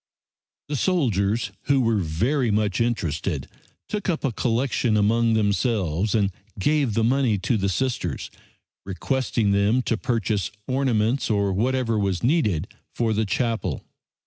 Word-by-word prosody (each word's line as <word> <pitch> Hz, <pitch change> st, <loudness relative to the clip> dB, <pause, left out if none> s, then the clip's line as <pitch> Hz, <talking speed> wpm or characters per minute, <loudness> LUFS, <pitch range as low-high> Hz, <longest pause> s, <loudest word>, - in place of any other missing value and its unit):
The 150 Hz, -, -3 dB
soldiers, 115 Hz, -, +1 dB
who 140 Hz, -1 st, +3 dB
were 115 Hz, -3 st, +2 dB
very 115 Hz, -, 0 dB
much 105 Hz, 0 st, +1 dB
interested, 85 Hz, -, -1 dB, 0.4 s
took 210 Hz, -2 st, -3 dB
up 165 Hz, -, -1 dB
a 135 Hz, -, +1 dB
collection 120 Hz, -1 st, 0 dB
among 115 Hz, +2 st, +3 dB
themselves 105 Hz, -, +1 dB
and 100 Hz, -3 st, +2 dB, 0.3 s
gave 140 Hz, +1 st, +1 dB
the 115 Hz, -, +2 dB
money 125 Hz, -2 st, +2 dB
to 115 Hz, +6 st, 0 dB
the 100 Hz, -2 st, 0 dB
Sisters, 95 Hz, -, -2 dB, 0.5 s
requesting 110 Hz, +2 st, -1 dB
them 100 Hz, +6 st, +2 dB
to 115 Hz, -, 0 dB
purchase 105 Hz, -8 st, -1 dB, 0.2 s
ornaments 130 Hz, -1 st, +1 dB
or 100 Hz, -2 st, +1 dB
whatever 115 Hz, +1 st, 0 dB
was 95 Hz, -1 st, -1 dB
needed 110 Hz, -, +1 dB, 0.3 s
for 115 Hz, -2 st, +1 dB
the 110 Hz, 0 st, 0 dB
chapel. 110 Hz, -, -1 dB
110 Hz, 135 wpm, -24 LUFS, 100-125 Hz, 0.5 s, who